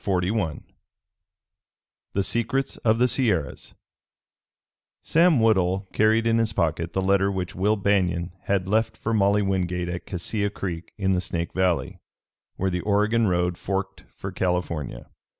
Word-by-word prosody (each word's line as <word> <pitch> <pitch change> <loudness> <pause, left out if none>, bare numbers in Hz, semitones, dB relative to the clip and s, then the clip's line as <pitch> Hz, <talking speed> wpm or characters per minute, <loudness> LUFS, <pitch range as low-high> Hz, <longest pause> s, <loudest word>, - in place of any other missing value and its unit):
CHAPTER 90 -2 0
XLI 95 -9 -1 1.5
THE 100 - +1
SECRETS 120 +6 -1
OF 110 -1 +2
THE 125 +2 +4
SIERRAS 100 - -1 1.3
Sam 165 -3 +4
Woodhull 95 -3 +2
carried 110 +1 +3
in 115 0 +3
his 110 -1 +1
pocket 85 -1 -1
the 95 - 0
letter 100 +1 +3
which 95 -1 -3
Will 105 +3 +1
Banion 95 -4 +1
had 95 -2 0
left 110 +3 +1
for 115 - -2
Molly 100 -1 +3
Wingate 90 -2 -1
at 90 0 -5
Cassia 100 +3 -2
Creek 90 -4 -5
in 95 -2 +1
the 90 - +1
Snake 85 -2 -4
Valley, 90 -3 0 0.6
where 95 0 -1
the 90 0 -1
Oregon 105 +3 +2
road 90 -1 0
forked 95 0 -3
for 95 - -6
California. 90 -8 -2
95 Hz, 145 wpm, -25 LUFS, 90-110 Hz, 1.5 s, THE